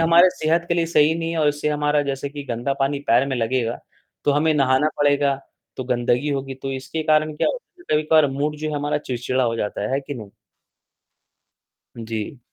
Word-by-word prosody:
हमारे 170 +2 +6
सेहत 165 +1 0
के 170 - +2
लिए 170 -1 +1
सही 160 -1 +4
नहीं 165 0 -3
है 165 - -2
और 150 -1 +3
इससे 145 +1 -1
हमारा 150 0 +1
जैसे 140 0 -3
कि 145 0 -7
गंदा 120 +4 -1
पानी 140 +1 +1
पैर 130 +4 +4
में 130 - -1
लगेगा, 115 0 -1 0.5
तो - - +3
हमें 155 +2 +2
नहाना 135 +1 +3
पड़ेगा, 145 -1 +3 0.4
तो 130 - -4
गंदगी 125 +2 0
होगी, 135 -1 -3
तो 135 +1 -5
इसके 135 +4 -4
कारण 155 0 +2
क्या - - +2
होता - - -8 0.2
है - - -13
ना - - -1
कभी-कभार 155 0 +4
मूड 145 +3 -2
जो 155 +1 -4
है - - -3
हमारा 145 +1 -1
चिड़चिड़ा 130 -1 -2
हो 115 -1 0
जाता 105 -2 -3
है, 105 - -2
है 135 - +1
कि 140 +1 -7
नहीं? 110 -5 -9 1.7
जी। 115 +2 -5
145 Hz, 210 wpm, -22 LUFS, 130-155 Hz, 1.7 s, हमारे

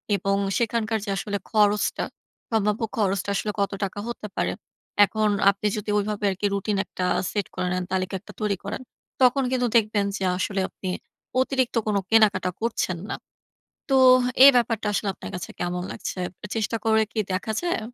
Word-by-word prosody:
এবং 195 0 0 0.2
সেখানকার 225 -1 0
যে - - -5
আসলে 200 0 -2
খরচটা, 210 -1 +2 0.5
সম্ভাব্য 210 0 +1 0.2
খরচটা 200 -1 0
আসলে 210 - -1
কত 200 - +1
টাকা 195 +1 -3
হতে 235 -3 -5
পারে। - - 0 0.5
এখন 215 +1 0 0.2
আপনি 200 +1 0
যদি 210 0 -5
ঐভাবে 210 0 -1
আর - - -4
কি - - +1
রুটিন 200 +1 -1
একটা 180 - -4 0.3
সেট 205 -2 -1
করে 180 0 -1
নেন 185 - -1
তালিকা 185 0 -1
একটা 200 - -14
তৈরি 205 -2 +1
করেন, 200 +6 -4 0.4
তখন 260 +2 +5
কিন্তু 250 -1 +1
দেখবেন 210 -2 +1
যে 195 - -4
আসলে 195 0 -1
আপনি 185 - -6 0.5
অতিরিক্ত 260 -2 0
কোন 210 - +1
কেনাকাটা 215 -4 +4
করছেন 225 -6 -1
না। - - -2 0.8
তো - - +4 0.5
এই 280 - +12
ব্যাপারটা 230 -3 +1
আসলে 205 - -1
আপনার - - -8
কাছে 180 - -5
কেমন 180 0 -2
লাগছে? - - -5 0.4
চেষ্টা 225 +1 -1
করে 220 0 +4
কি 220 - -5
দেখা 185 +4 -2
যায়? 345 -9 0
210 Hz, 170 wpm, -25 LUFS, 195-225 Hz, 0.8 s, এই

